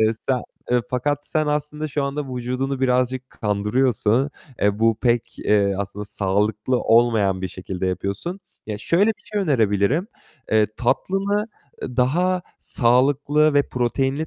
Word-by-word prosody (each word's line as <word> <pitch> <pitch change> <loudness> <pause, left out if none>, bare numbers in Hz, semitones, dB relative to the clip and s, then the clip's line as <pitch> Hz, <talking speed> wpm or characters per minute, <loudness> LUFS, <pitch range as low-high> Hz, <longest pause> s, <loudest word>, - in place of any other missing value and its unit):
Eee, 110 0 +4 0.2
sen 130 -2 +2 0.5
fakat 145 +3 -1
sen 155 -1 0
aslında 150 +1 -2
şu 140 0 -1
anda 140 -2 -4
vücudunu 130 +2 -2
birazcık 130 0 0
kandırıyorsun. 110 +4 +1 0.3
Eee, 105 +1 +2
bu 115 -1 +3
pek, 120 -1 0
eee, 100 -2 +2
aslında 100 +1 -4
sağlıklı 105 +5 0
olmayan 110 -5 +3
bir 95 - -2
şekilde 95 +1 -5
yapıyorsun. 100 - -3 0.3
Ya, 105 -1 -4
şöyle 175 - +2
bir 210 -1 -7
şey 205 - +1
önerebilirim: 125 - +1 0.4
Eee, 110 -1 +5
tatlını, 200 - 0 0.3
eee, 125 - -6
daha 175 +8 +2 0.2
sağlıklı 140 +5 +2
ve 145 - +3
proteinli 135 +5 -1
125 Hz, 135 wpm, -22 LUFS, 105-145 Hz, 0.5 s, Eee